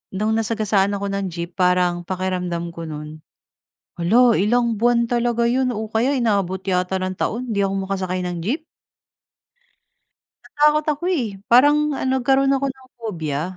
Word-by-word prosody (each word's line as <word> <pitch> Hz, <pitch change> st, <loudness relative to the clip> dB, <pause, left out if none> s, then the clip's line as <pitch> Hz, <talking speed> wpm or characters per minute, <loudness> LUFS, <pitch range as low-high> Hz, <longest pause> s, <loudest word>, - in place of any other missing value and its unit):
no'ng 215 Hz, +3 st, 0 dB
nasagasaan 210 Hz, -3 st, +1 dB
ako 200 Hz, 0 st, -3 dB
ng 200 Hz, 0 st, -2 dB
jeep 170 Hz, 0 st, -6 dB
parang 180 Hz, -1 st, +2 dB
pakiramdam 180 Hz, -2 st, -3 dB
ko 165 Hz, -1 st, -8 dB
no'n, 150 Hz, 0 st, -8 dB, 0.8 s
hala 230 Hz, +8 st, +4 dB
ilang 235 Hz, +3 st, +1 dB
buwan 235 Hz, +1 st, +2 dB
talaga 235 Hz, -1 st, +1 dB
'yon 255 Hz, +1 st, +1 dB
o 220 Hz, -1 st, -4 dB
kaya 225 Hz, +5 st, +1 dB
inabot 200 Hz, -8 st, 0 dB
yata 185 Hz, 0 st, 0 dB
ng 185 Hz, 0 st, -3 dB
taon, 245 Hz, +3 st, -2 dB
'di 200 Hz, -3 st, 0 dB
ako 195 Hz, 0 st, -1 dB
makasakay 185 Hz, -2 st, -2 dB
ng 175 Hz, -1 st, -3 dB
jeep. 275 Hz, -, -1 dB, 1.8 s
Natakot 300 Hz, +1 st, +2 dB
ako 295 Hz, -, -15 dB
eh. 265 Hz, -11 st, 0 dB, 0.2 s
Parang 295 Hz, +4 st, +5 dB
ano, 265 Hz, 0 st, 0 dB
nagkaroon 270 Hz, +2 st, +3 dB
ako 275 Hz, +1 st, -1 dB
ng 260 Hz, 0 st, -20 dB
phobia. 160 Hz, -10 st, -3 dB
215 Hz, 150 wpm, -21 LUFS, 180-245 Hz, 1.8 s, Parang